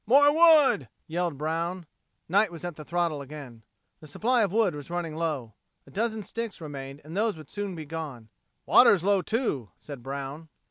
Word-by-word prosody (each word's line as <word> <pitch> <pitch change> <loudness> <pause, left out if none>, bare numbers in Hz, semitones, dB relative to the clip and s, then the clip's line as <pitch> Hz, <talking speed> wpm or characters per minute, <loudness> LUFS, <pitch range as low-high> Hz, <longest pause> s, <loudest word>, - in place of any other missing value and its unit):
"More 285 +4 +6
wood!" 310 - +6 0.2
yelled 170 -2 -2
Brown. 165 +4 -2 0.4
Knight 200 +3 +3
was 170 0 -8
at 175 -3 -4
the 155 - -9
throttle 170 -2 -1
again. 135 -5 -9 0.4
The 155 - -13
supply 235 - +1
of 200 -4 +1
wood 215 -4 +2
was 145 0 -8
running 170 -2 -3
low. 150 -9 -2 0.3
A - - -16
dozen 220 +1 -1
sticks 230 +1 -5
remained 140 -2 -7
and 155 +3 -9
those 215 -2 +1
would 155 -2 -12
soon 205 -2 -4
be 160 -2 -7
gone. 145 -8 -6 0.4
"Water's 180 -4 +6
low, 200 0 +3
too," 180 - -1
said 140 -4 -9
Brown. 140 +4 -6
165 Hz, 180 wpm, -27 LUFS, 145-205 Hz, 0.4 s, More